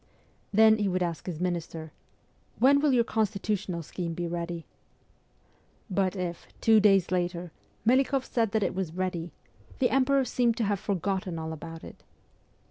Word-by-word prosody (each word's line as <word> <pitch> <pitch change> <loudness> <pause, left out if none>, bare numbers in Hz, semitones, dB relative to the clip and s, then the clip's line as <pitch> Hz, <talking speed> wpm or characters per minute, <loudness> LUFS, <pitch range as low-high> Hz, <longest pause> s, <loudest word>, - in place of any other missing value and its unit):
Then 220 +1 +6
he 205 - +1
would 185 -1 0
ask 170 -1 -4
his 170 -4 -4
minister, 170 -3 -3 0.3
' - - -38
When 275 +3 +5
will 295 0 +3
your 245 -2 +4
constitutional 200 -5 -1
scheme 170 +1 -5
be 175 0 -3
ready? 170 -1 -4 0.7
' - - -37
But 190 0 +1
if, 175 -2 -4
two 220 -1 +5
days 195 -4 +4
later, 175 -1 -1 0.3
Melikoff 265 +2 +3
said 230 -3 0
that 220 -2 +2
it - - 0
was 180 -3 -3
ready, 180 -2 -2 0.5
the 255 - +2
Emperor 270 0 +3
seemed 240 -2 +1
to 235 - 0
have 205 -2 0
forgotten 190 -2 -2
all 160 0 -4
about 165 +1 -9
it. - - -11
190 Hz, 165 wpm, -28 LUFS, 170-220 Hz, 0.7 s, Then